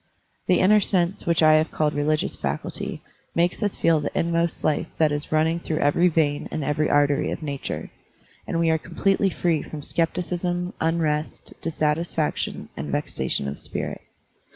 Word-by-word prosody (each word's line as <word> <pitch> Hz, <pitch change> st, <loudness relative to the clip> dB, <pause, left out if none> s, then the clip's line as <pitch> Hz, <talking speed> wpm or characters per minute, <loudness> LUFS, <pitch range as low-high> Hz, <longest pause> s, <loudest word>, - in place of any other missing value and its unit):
The 180 Hz, -, +4 dB
inner 210 Hz, +3 st, +6 dB
sense 185 Hz, -2 st, 0 dB
which 170 Hz, -1 st, +3 dB
I 155 Hz, 0 st, +7 dB
have 155 Hz, +1 st, +3 dB
called 150 Hz, -1 st, 0 dB
religious 150 Hz, +1 st, 0 dB
faculty -, -, -4 dB, 0.3 s
makes 175 Hz, +5 st, +1 dB
us 205 Hz, -2 st, 0 dB
feel 165 Hz, -2 st, +3 dB
the 145 Hz, -, -2 dB
inmost 170 Hz, 0 st, 0 dB
life 155 Hz, -, +1 dB
that 155 Hz, -2 st, +3 dB
is 145 Hz, 0 st, -2 dB
running 160 Hz, +2 st, +2 dB
through 160 Hz, -2 st, -3 dB
every 155 Hz, +5 st, +3 dB
vein 155 Hz, -4 st, +1 dB
and 155 Hz, -, -3 dB
every 150 Hz, +2 st, +1 dB
artery 145 Hz, 0 st, +3 dB
of 165 Hz, -, -4 dB
nature; 140 Hz, -2 st, -4 dB, 0.6 s
and 165 Hz, -, -1 dB
we 165 Hz, -1 st, +3 dB
are 160 Hz, -, +2 dB
completely 195 Hz, +4 st, +1 dB
free 170 Hz, -4 st, 0 dB
from 150 Hz, -2 st, -8 dB
skepticism, 175 Hz, +2 st, -1 dB
tmrest, 160 Hz, -2 st, -1 dB
dissatisfaction, 155 Hz, 0 st, -1 dB
and 70 Hz, +1 st, -5 dB
vexation 70 Hz, -, -1 dB
of 70 Hz, -, -5 dB
spirit. -, -, -4 dB
160 Hz, 160 wpm, -24 LUFS, 150-170 Hz, 0.6 s, I